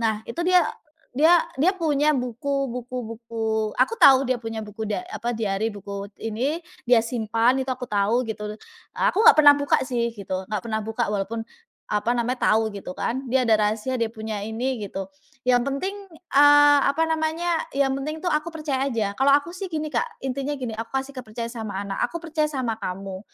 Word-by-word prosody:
Nah, 220 -1 0
itu 235 - -5
dia 360 0 +4 0.5
dia 320 +6 +6 0.2
dia 360 - +5
punya 305 -5 +1
buku 275 +1 -1
buku 250 0 -6
buku, 225 -1 -2
aku 460 - +3
tahu 270 - +6
dia 255 - +2
punya 225 -2 -5
buku 210 +1 -8
da 210 -1 -2
apa, 240 - -4
diary, 220 -1 -1
buku 200 -1 -7
ini, 245 +8 -2 0.2
dia 245 -1 +5
simpan, 230 +1 +1
itu 260 - -5
aku 255 0 -3
tahu, 215 +4 +1
gitu. 210 -1 -5 0.4
Aku 415 - +2
nggak 460 -6 +8
pernah 290 -1 +9
buka 285 0 +2
sih, 235 -2 -1
gitu, 195 -4 -5
nggak 210 - 0
pernah 220 -1 -2
buka 220 +1 -2
walaupun, 210 +3 -3 0.4
apa 210 +4 0
namanya, 245 +2 0
tahu 220 0 +2
gitu 195 -2 -7
kan, 260 +2 -3
dia 255 +1 +2
ada 220 -2 +4
rahasia, 220 +4 -1
dia 230 - +1
punya 220 -2 -5
ini, 230 +4 -3
gitu. 195 0 -5 0.4
Yang 245 -1 +4
penting, 325 +9 -2 0.4
eee, 290 0 +7
apa 300 +4 +2
namanya, 320 +1 0 0.2
yang 275 -1 +2
penting 305 +5 -4
tuh 355 - +1
aku 305 +2 0
percaya 295 -5 -2
aja. 220 -6 -1
Kalau 270 +6 +1
aku 290 +4 -3
sih 375 +1 -6
gini, 310 -2 -4
Kak, 475 -1 -2
intinya 275 +2 -2
gini, 250 -4 -4
aku 225 +1 -5
kasih 270 +1 -3
kepercayaan 235 -2 -6
sama 220 -5 -5
anak, 195 -1 -4
"Aku 340 - -6
percaya 310 -2 0
sama 250 -6 -3
kamu. 190 +1 -5
245 Hz, 190 wpm, -24 LUFS, 220-290 Hz, 0.5 s, pernah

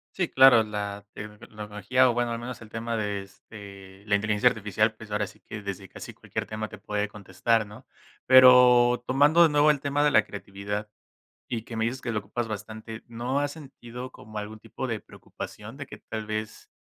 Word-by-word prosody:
Sí 180 -3 0
claro, 130 -4 +7
la 105 -1 -5
tecnología, 105 +3 -1
o - - +1
bueno, 120 0 -1
al 115 - -3
menos 120 0 -7
el 110 - -12
tema 115 0 -3
de, 100 -2 -2
este, 100 -1 -13
la 105 - 0
inteligencia 105 +3 +3
artificial, 110 +1 0
pues, 110 -1 -13
ahora 105 0 0
sí - - -16
que, 105 -1 -9
desde 100 -1 -6
casi - - -9
cualquier - - -5
tema 110 0 -5
te 105 - -10
puede 105 0 -3
contestar, 110 +2 0
¿no? 105 +6 -14 0.4
Pero, 125 -1 +7
tomando 145 +6 +5
de 165 - +7
nuevo 150 +1 +4
el 140 -2 +1
tema 145 +1 0
de 150 - +4
la 110 -5 +4
creatividad, 100 +1 -6 0.6
y 115 -3 -3
que 115 - -9
me 110 - 0
dices 125 +3 -2
que 115 - -4
lo 105 - 0
ocupas 115 +4 -4
bastante, 110 +1 -7
¿no 120 +4 -2
has 145 -1 -1
sentido 130 -4 -10
como 110 -1 -11
algún 105 +1 -6
tipo 130 - -6
de 110 -3 -3
preocupación 105 +4 -10
de 140 0 -7
que - - -11
tal 110 -1 -6
vez, 110 0 -5
110 Hz, 200 wpm, -26 LUFS, 105-125 Hz, 0.6 s, claro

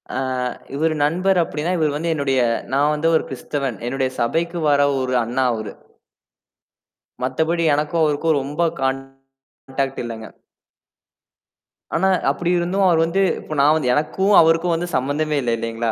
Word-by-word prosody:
ஆ, - - -1 0.6
இவர் 160 +2 +1
நண்பர் 180 +6 +2
அப்படின்னா 160 +2 -3
இவர் 155 -3 +1
வந்து 165 +3 -2
என்னுடைய 135 -3 0 0.3
நான் 145 +2 +3
வந்து 155 +2 0
ஒரு - - +2
கிறிஸ்தவன். 135 -2 -4
என்னுடைய 130 0 -1
சபைக்கு 170 +8 -1
வர 140 0 +3
ஒரு 130 0 -1
அண்ணா 125 +3 -1
அவரு. 110 -1 -5 1.5
மத்தபடி 160 +6 0
எனக்கும் 150 +3 0
அவருக்கும் 155 +1 +1
ரொம்ப 145 +5 -4 0.2
கான்டாக்ட் 135 0 -4 0.7
இல்லங்க. 115 -2 -7 1.7
ஆனா, 190 - +2 0.2
அப்படி 175 0 -3
இருந்தும் 185 +3 0
அவர் 165 -2 +3
வந்து 175 +4 0 0.2
இப்ப 155 - -7
நான் 145 +2 +5
வந்து 125 -5 0
எனக்கும் 190 +8 +1
அவருக்கும் 165 +1 +3
வந்து 175 +2 -3
சம்பந்தமே 145 +3 0
இல்லை 120 -2 0
இல்லைங்களா? 115 0 -2
150 Hz, 140 wpm, -20 LUFS, 135-165 Hz, 1.7 s, நான்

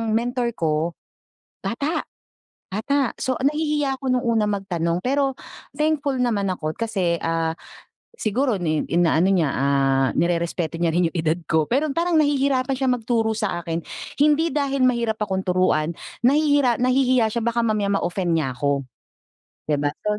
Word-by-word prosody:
mentor 240 +1 -1
ko, 160 +1 0 0.7
bata, 295 +7 -2 0.7
bata. 265 +6 0
So, 260 -2 -1
nahihiya 295 -1 0
ako 265 - -3
nung 250 -1 +1
una 225 -3 +2
magtanong, 175 -4 -1
pero 270 0 +1 0.4
thankful 300 -2 0
naman 215 -6 0
ako 155 -4 -2
kasi, 190 -7 -1
ah, 165 -1 0 0.6
siguro 235 - 0
ni 155 -2 0
inaano 175 +2 +3
niya, 170 -6 +2
ah, 135 0 +2
nirerespeto 170 -1 -1
niya 170 -1 +1
rin 175 -1 +3
yung - - -8
edad 160 -1 +1 0.2
ko, 160 -2 +3
pero 280 +6 +1
parang 335 +4 0
nahihirapan 275 -2 +1
siyang 260 -2 +2
magturo 225 -1 0
sa 205 -5 -2
akin. 165 0 -2 0.4
Hindi 305 +2 +3
dahil 275 -3 +1
mahirap 235 -3 0
akong 190 -3 -1
turuan, 180 -3 +1 0.3
nahihira 285 -2 +3
nahihiya 255 -3 +2
siya 235 - -1
baka 235 +1 0
mamaya 210 -3 0
ma-offend 175 -1 -1
niya 135 -5 -1
ako, 140 +1 -1 0.8
di 150 - +2
ba? 145 0 0
So, 210 0 -1
220 Hz, 150 wpm, -22 LUFS, 170-265 Hz, 0.8 s, inaano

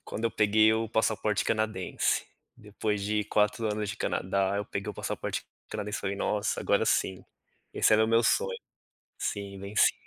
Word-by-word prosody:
Quando 115 - -5
eu 115 - +2
peguei 110 +1 +4
o 110 0 0
passaporte 110 -2 +1
canadense, 110 -4 0 0.3
depois 105 0 -3
de 105 +1 0
4 105 +2 +1
anos 105 0 -2
de 100 - -6
Canadá, 95 +1 0
eu 105 - -1
peguei - - -4
o - - -10
passaporte - - -4 0.2
canadense 105 0 -4
e - - -7
falei: 100 0 -2
"Nossa, 105 +1 -1
agora - - +2
sim, 95 -1 +1 0.5
esse - - +3
era 110 0 +5
o 110 - -1
meu 115 +1 +4
sonho. 475 0 +1 0.6
Sim, 100 -1 -4
venci. 100 +2 +3
105 Hz, 175 wpm, -29 LUFS, 100-110 Hz, 0.6 s, era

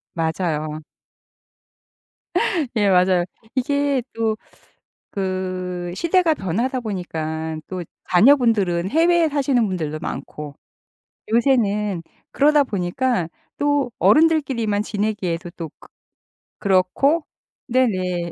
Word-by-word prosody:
맞아요 160 -2 -2 1.9
예. 205 -3 +3
맞아요. 180 -1 +4 0.3
이게 280 0 +1
또 220 -1 0 0.7
그 185 -2 -3
시대가 335 - +2
변하다 235 - -1
보니까 160 -6 -4
또 185 -1 -5 0.3
자녀분들은 205 -5 +4
해외에 335 0 +4
사시는 275 -5 +1
분들도 155 -5 -3
많고 150 -3 -6 0.8
요새는 210 -7 +2 0.3
그러다 295 0 +4
보니까 200 -1 -1 0.3
또 290 -4 +1
어른들끼리만 270 -10 +3
지내기에도 200 -6 -2
또 165 -2 -5
그 - - -16 0.7
그렇고 200 - +2 0.4
네네. 185 -9 0
205 Hz, 215 characters per minute, -21 LUFS, 175-265 Hz, 1.9 s, 맞아요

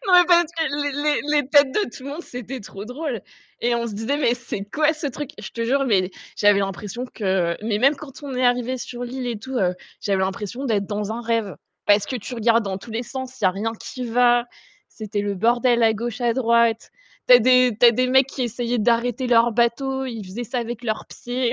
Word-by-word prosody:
Non, 360 -1 +7
parce 345 -1 +5
que 330 -2 -1 0.2
les 290 -1 -1
les 300 0 +2 0.2
les 290 -3 +1
têtes 285 -3 +5
de 415 - 0
tout 255 - -11
le 280 - -6
monde, 325 +4 -6
c'était 250 +1 -7
trop 200 0 -9
drôle 250 0 -4 0.4
et 240 0 +1
on 235 0 -1
se 220 - -5
disait: 225 +7 -2
«Mais 245 -5 +2
c'est 235 -4 -6
quoi 305 +8 +1
ce 305 -1 -5
truc?» 285 +2 -5
Je - - -8
te 230 0 -3
jure, 275 +3 +2
mais 190 -5 +2 0.3
j'avais 205 -1 +4
l'impression 195 +5 -4
que, 190 -7 -1
mais 215 -2 0
même 275 +4 +4
quand 290 -1 -11
on 275 -2 -6
est 255 0 0
arrivé 245 +1 +1
sur 245 0 -7
l'île 250 +1 -5
et 235 -3 -3
tout, 260 +4 -6 0.4
j'avais 195 -2 0
l'impression 210 +7 -3
d'être 205 -5 0
dans 210 0 -3
un 230 - -4
rêve 225 -4 -1 0.3
parce 205 0 +4
que 260 - -3
tu 245 +2 -7
regardes 230 -1 +2
dans 190 -1 -3
tous 225 - -12
les 225 +2 -2
sens, 260 0 -7
il - - -2
y - - +7
a 185 - +5
rien 215 +4 -3
qui 250 +3 -7
va, 240 0 +3 0.4
c'était 215 -1 -4
le 205 -1 -2
bordel 240 +4 +2
à 225 - +5
gauche, 235 +3 -4
à 240 -1 +2
droite. 235 -2 +2 0.4
Tu 250 - +10
as - - +9
des 250 -1 +4
tu 245 - +7
as - - +9
des 255 +2 +1
mecs 265 +1 +5
qui 270 - -4
essayaient 240 0 -2
d'arrêter 235 +3 +1
leur 235 -1 +4
bateau, 265 +4 0
ils 230 -5 -6
faisaient 195 +6 -6
ça 250 +3 -3
avec 240 0 -5
leurs 215 -2 -2
pieds. 245 0 -2
240 Hz, 235 wpm, -22 LUFS, 215-255 Hz, 0.4 s, Tu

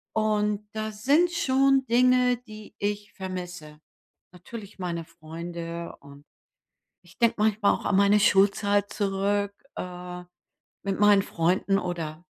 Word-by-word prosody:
und 210 -1 0
da 215 0 -3
sind 285 +12 +2
schon 270 -4 +2
Dinge, 250 +1 +4
die 215 -3 -13
ich 205 0 -3
vermisse. 180 -5 -7 0.5
Natürlich 200 +3 -10
meine 170 -2 -3
Freunde, 170 +1 -7
und 140 0 -15 0.8
ich 175 -1 -20
denke 235 -1 +3
manchmal 210 -1 +3
auch - - -6
an 190 - +2
meine 200 +1 +5
Schulzeit 200 0 +3
zurück, 200 0 0 0.2
äh, 180 0 -7 0.6
mit 195 0 -2
meinen 205 -1 +6
Freunden 185 +3 +1
oder 165 -2 -5
200 Hz, 120 wpm, -26 LUFS, 180-215 Hz, 0.8 s, meinen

